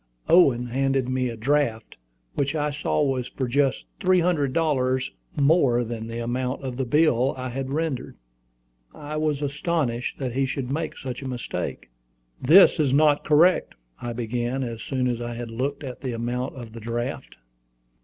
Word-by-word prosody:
Owen 135 Hz, -9 st, +5 dB
handed 135 Hz, +1 st, 0 dB
me 130 Hz, -1 st, 0 dB
a 115 Hz, -, -6 dB
draft, 120 Hz, -2 st, 0 dB, 0.4 s
which 140 Hz, +2 st, -1 dB
I 150 Hz, -1 st, 0 dB
saw 150 Hz, +1 st, 0 dB
was 130 Hz, -3 st, 0 dB
for 130 Hz, -, -3 dB
just 135 Hz, +2 st, +1 dB
three 185 Hz, -1 st, +4 dB
hundred 165 Hz, -6 st, +1 dB
dollars 130 Hz, -5 st, +1 dB, 0.2 s
more 140 Hz, -5 st, +3 dB
than 115 Hz, -1 st, -5 dB
the 115 Hz, 0 st, -5 dB
amount 125 Hz, +3 st, -2 dB
of 130 Hz, -2 st, -4 dB
the 130 Hz, +1 st, -2 dB
bill 135 Hz, -1 st, +3 dB
I 130 Hz, 0 st, -4 dB
had 135 Hz, +2 st, -4 dB
rendered. 150 Hz, -2 st, -3 dB, 0.8 s
I 150 Hz, +1 st, -6 dB
was 150 Hz, -2 st, 0 dB
astonished 145 Hz, -4 st, -1 dB
that 130 Hz, -3 st, -3 dB
he 135 Hz, +1 st, +1 dB
should 130 Hz, -1 st, -3 dB
make 155 Hz, +2 st, -3 dB
such 130 Hz, -1 st, -6 dB
a 135 Hz, -, -5 dB
mistake. 125 Hz, -, -5 dB, 0.5 s
"This 165 Hz, +6 st, +7 dB
is 140 Hz, -3 st, +3 dB
not 150 Hz, -1 st, +4 dB
correct," 165 Hz, +5 st, +4 dB, 0.3 s
I 120 Hz, -, -3 dB
began, 120 Hz, +2 st, -2 dB
as 115 Hz, -3 st, -5 dB
soon 130 Hz, +1 st, -1 dB
as 120 Hz, -1 st, -1 dB
I 120 Hz, 0 st, -4 dB
had 120 Hz, -1 st, -6 dB
looked 140 Hz, +6 st, -3 dB
at 130 Hz, -3 st, -7 dB
the 130 Hz, -3 st, -3 dB
amount 120 Hz, +3 st, -3 dB
of 120 Hz, -4 st, -9 dB
the 115 Hz, -, -8 dB
draft. 115 Hz, +2 st, -4 dB
130 Hz, 175 wpm, -25 LUFS, 120-145 Hz, 0.8 s, This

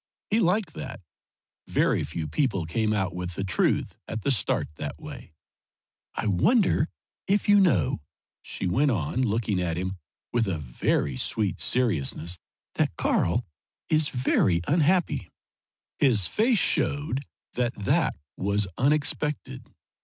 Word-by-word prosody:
He 220 Hz, -, +4 dB
liked 185 Hz, -3 st, +1 dB
that. -, -, -7 dB, 0.7 s
Very -, -, +2 dB
few 80 Hz, 0 st, -4 dB
people 95 Hz, -, 0 dB
came 110 Hz, +7 st, 0 dB
out 95 Hz, -4 st, 0 dB
with 90 Hz, -1 st, -5 dB
the 100 Hz, -, -2 dB
truth 95 Hz, -, +1 dB
at 110 Hz, -2 st, -5 dB
the 140 Hz, -, +2 dB
start 115 Hz, -9 st, +1 dB
that 75 Hz, -, -5 dB
way. -, -, -10 dB, 0.8 s
"I -, -, -2 dB
wonder 160 Hz, -, +3 dB, 0.4 s
if 205 Hz, +2 st, +2 dB
you 205 Hz, 0 st, +7 dB
know," 125 Hz, -, +2 dB, 0.4 s
she -, -, -5 dB
went 135 Hz, +11 st, +2 dB
on, 110 Hz, -, 0 dB
looking 110 Hz, -5 st, 0 dB
at 85 Hz, -2 st, -1 dB
him 95 Hz, +1 st, -3 dB, 0.4 s
with 115 Hz, -2 st, +2 dB
a 90 Hz, -4 st, -1 dB
very 65 Hz, -1 st, -1 dB
sweet 105 Hz, -, -1 dB
seriousness, 85 Hz, -, 0 dB, 0.3 s
"that -, -, 0 dB
Karl 115 Hz, +9 st, +1 dB, 0.4 s
is 155 Hz, -1 st, +3 dB
very 100 Hz, -8 st, +2 dB
unhappy?" 165 Hz, -, +2 dB, 0.7 s
His 115 Hz, -9 st, +4 dB
face 230 Hz, -, +2 dB
showed 145 Hz, -5 st, +1 dB, 0.3 s
that 120 Hz, 0 st, -1 dB
that 140 Hz, +11 st, +1 dB, 0.2 s
was 100 Hz, +1 st, 0 dB
unexpected. 145 Hz, -2 st, 0 dB
115 Hz, 130 wpm, -26 LUFS, 90-150 Hz, 0.8 s, you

